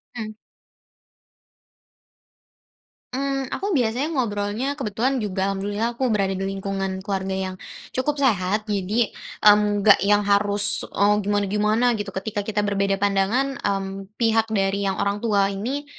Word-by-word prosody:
Mmm. 215 -2 -5 2.8
Mmm, 275 +1 -1
aku 395 -5 -1
biasanya 250 +5 0
ngobrolnya 230 -1 -1
kebetulan 255 0 -1
juga 190 -2 -1
alhamdulillah 205 +4 -2
aku 255 +1 -1
berada 195 -3 +1
di 190 - -4
lingkungan 195 -1 -3
keluarga 190 -1 -2
yang, 185 0 -5 0.4
cukup 290 +3 -1
sehat 210 -5 +1
jadi, 210 +2 0 0.3
mmm, 210 -1 +5
nggak 205 - +7
yang 205 +1 +3
harus, 205 +1 +3
eee, 210 +1 +2
gimana-gimana 210 +4 +1
gitu 205 -2 -4
ketika 205 +2 -3
kita 210 0 -1
berbeda 200 -1 0
pandangan, 205 +7 +1
mmm, 195 -1 -3
pihak 225 -1 +2
dari 200 -1 0
yang 190 - -3
orang 200 +1 -1
tua 205 -4 +2
ini, 255 +9 -3
205 Hz, 130 wpm, -23 LUFS, 195-230 Hz, 2.8 s, nggak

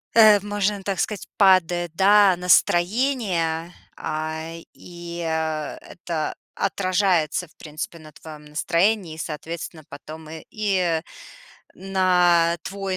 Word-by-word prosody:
Э, 215 -3 +7
можно 205 0 -2
так 195 -2 -2
сказать, 210 -2 -3
падает, 175 -3 +3
да, 195 0 +5
настроение, 180 -2 +1 0.2
а, 155 +1 -4 0.2
и, 175 -1 -10
э, 160 -2 -2
это 165 -3 -5 0.2
отражается, 185 -3 0
в 165 - -28
принципе, 155 +2 -7
на 155 -1 -13
твоём 150 0 -12
настроении 170 +4 0
и, 160 - -13
соответственно, 160 0 -6
потом 155 +2 -10
и 160 0 -8
и 185 -6 0 0.7
на 180 -3 +2
твой 195 -1 -4
175 Hz, 110 wpm, -23 LUFS, 160-195 Hz, 0.7 s, Э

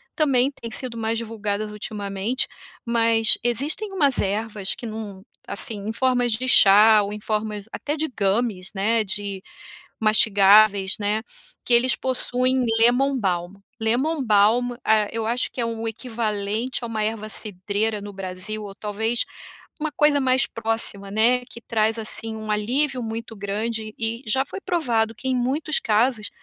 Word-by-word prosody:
também 270 -4 +3
têm 230 -4 -9
sido 240 0 -3
mais 225 0 -1
divulgadas 215 -2 -3
ultimamente, 210 +2 -3 0.4
mas 230 -1 +3
existem 285 - -1
umas 285 -8 +3
ervas 205 0 -2
que - - -9
num 215 -3 -7 0.3
assim, 210 +1 0
em 220 - -2
formas 245 0 +1
de 255 +4 -2
chá 210 -1 +7
ou 200 +1 -4
em 210 - -6
formas 210 -1 -3
até 295 - -3
de 315 +1 -1
gummies, 200 -3 -1
né, 220 +3 +2
de 200 -1 -4 0.6
mastigáveis, 205 -2 +5
né, 210 +1 0 0.4
que 245 - +2
eles 250 +2 +4
possuem 255 0 0
lemon 255 +4 +3
balm, 180 -4 -2 0.2
lemon 265 +7 0
balm, 220 +3 +3
ah, 215 -1 +3
eu 225 0 -3
acho 240 +2 -1
que 250 - -4
é - - 0
um 230 0 -4
equivalente 225 0 -3
a - - -3
uma 220 -2 -2
erva 215 0 -3
cidreira 210 +1 -2
no 205 0 -8
Brasil, 195 +3 -5
ou 200 -1 -8
talvez 220 +3 -1 0.5
uma 310 0 -2
coisa 295 -1 +4
mais 260 0 +3
próxima, 225 -3 -1
né, 235 +4 +3
que 235 - -8
traz 220 -1 0
assim 220 0 -2
um 215 -1 -5
alívio 250 +6 0
muito 225 0 -6
grande 215 +2 -3
e 230 +2 -1
já 265 +5 +1
foi 390 - -7
provado 235 - 0
que 260 - -6
em 260 - +1
muitos 275 +5 0
casos 220 0 +1
225 Hz, 155 wpm, -23 LUFS, 210-245 Hz, 0.6 s, chá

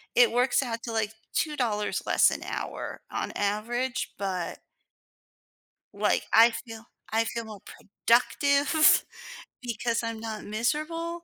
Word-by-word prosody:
it 245 -2 +6
works 250 +3 +2
out 230 -2 -4
to, 235 - -4
like, 220 -1 -1 0.2
$2 240 -9 -1
less - - +5
an - - -4
hour - - -5
on - - -3
average, 235 +5 -2
but 190 -3 -3 1.3
like, - - 0
I 230 +1 +7
feel 225 -1 -8 0.3
I 225 +1 +3
feel 230 0 -4
more 210 -3 -10
productive 280 +8 +3 0.6
because 235 -1 -2
I'm 230 -1 -3
not 220 -1 -6
miserable 320 +10 -2
230 Hz, 125 wpm, -27 LUFS, 220-260 Hz, 1.3 s, I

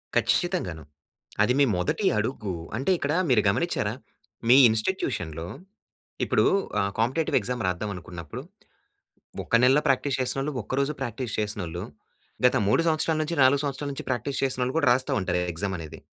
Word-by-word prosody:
కచ్చితంగాను. 80 -3 0 0.6
అది 125 - +2
మీ 140 - +6
మొదటి 90 - -1
అడుగు. 105 -3 -2 0.2
అంటే, 135 +9 0
ఇక్కడ 145 -2 -1 0.2
మీరు 120 -4 +5
గమనిచ్చేరా? - - 0 0.6
మీ 125 - +9
ఇన్స్టిట్యూషన్‌లో, 90 - -2 0.8
ఇప్పుడూ - - +2 0.3
ఆహ్, 100 0 0
కాంపిటేటివ్ 130 +8 +1
ఎగ్జామ్ 120 +2 -3
రాద్దాం 90 +4 -2
అనుకున్నప్పుడు, 85 -3 -8 1.0
ఒక - - 0
నెల్లో 135 +4 +5
ప్రాక్టీస్ 135 0 +1
చేసినోళ్ళు, 135 +3 -1
ఒక్క 105 - -8
రోజు 140 +2 0
ప్రాక్టీస్ 120 0 -4
చేసినోళ్ళు, 95 -5 -3 0.6
గత 125 - +5
3 105 - +3
సంవత్సరాల 160 0 +1
నుంచి, 165 +2 -3
4 140 +2 +4
సంవత్సరాల 140 0 -3
నుంచి - - -7
ప్రాక్టీస్ 130 +2 -2
చేసినోళ్ళు 130 -1 -1
కూడా, 155 -5 +2
రాస్తా 130 +1 +1
ఉంటారు 90 -2 -1
ఎ - - -2
ఎగ్జామనేది. 85 -3 -5
125 Hz, 145 wpm, -26 LUFS, 95-135 Hz, 1.0 s, మీ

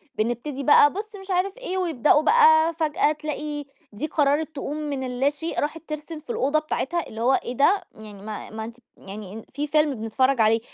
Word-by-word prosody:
بنبتدي 240 +5 -2
بقى 290 0 +6
بُص 425 +2 -6
مش 385 0 -7
عارف 375 +3 0
إيه، - - -4
ويبدأوا 305 -5 +3
بقى 320 -4 +5
فجأة 315 +1 +1
تلاقي 300 -1 -4 0.3
دي 235 +10 -3
قررت 300 +1 +1
تقوم 285 +1 -4
من 290 -3 -3
اللاشيء 280 +6 -1
راحت 310 +2 -2
ترسم 305 +1 -6
في 305 - -23
الأوضة 280 +5 +1
بتاعتها، 310 +2 -2
اللي 220 - -7
هو 260 +3 +3
إيه 245 - -5
ده؟! 380 +8 +4
يعني 210 -2 -11
ما 210 0 -7
ما 220 0 -6
أنتِ 230 +2 -9 0.2
يعني 205 +2 -9
في 295 +1 -2
فيلم 300 -1 +2
بنتفرج 235 +3 +1
عليه، 220 +1 +4
295 Hz, 185 wpm, -24 LUFS, 245-315 Hz, 0.3 s, بقى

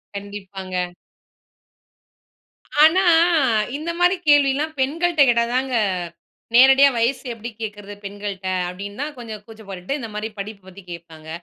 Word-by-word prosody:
கண்டிப்பாங்க. 190 -3 -5 1.9
ஆனா, 345 +5 +6 0.8
இந்த 320 +3 -5
மாரி 355 +2 +4
கேள்வில்லாம் 290 +2 +3
பெண்கள்ட்ட 325 +4 +1
கேட்டா 235 -1 +3
தாங்க 260 -1 0 0.8
நேரடியா 270 +2 +7
வயசு 240 +5 0
எப்படி 230 +1 -7
கேட்கிறது, 205 -1 -6
பெண்கள்ட்ட. 200 -1 -6 0.2
அப்படினு 200 +5 -8
தான் 295 0 -4
கொஞ்சம் 220 -3 -8
கூச்சம் 220 -2 -14
பட்டுட்டு, 190 +9 -4
இந்த 225 -3 -6
மாரி 215 +1 -3
படிப்பை 200 -1 -7
பத்தி 190 +1 -13
கேட்பாங்க, 160 -2 -11
220 Hz, 120 wpm, -21 LUFS, 195-275 Hz, 1.9 s, நேரடியா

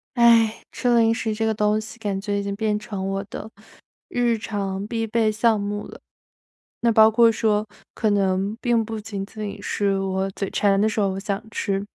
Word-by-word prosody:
唉， 230 -2 +5
吃 245 -1 +1
零 225 -1 +4
食 225 -1 -2
这 220 +1 -1
个 220 - +1
东 210 0 +1
西， 220 +2 -9
感 205 -4 -2
觉 205 0 -2
已 200 - -2
经 200 0 -3
变 210 0 0
成 200 -3 -5
我 195 0 -2
的 215 - -7 0.6
日 240 -2 +1
常 200 -3 -3
必 225 +1 -2
备 220 0 +2
项 220 +1 +2
目 205 +1 -4
了。 - - -12 0.8
那 235 - +3
包 220 0 +7
括 230 +1 +5
说， 215 -1 +1 0.3
可 220 - 0
能 195 +1 0
并 240 -3 +2
不 225 -1 -5
仅 205 -2 -5
仅 210 0 -7
是 200 -1 0
我 190 0 -1
嘴 195 0 -4
馋 195 -1 +2
的 215 - +3
时 215 - -2
候， 200 -2 +2
我 190 0 -3
想 200 0 -3
吃。 200 -1 -2
210 Hz, 215 characters per minute, -23 LUFS, 200-225 Hz, 0.8 s, 包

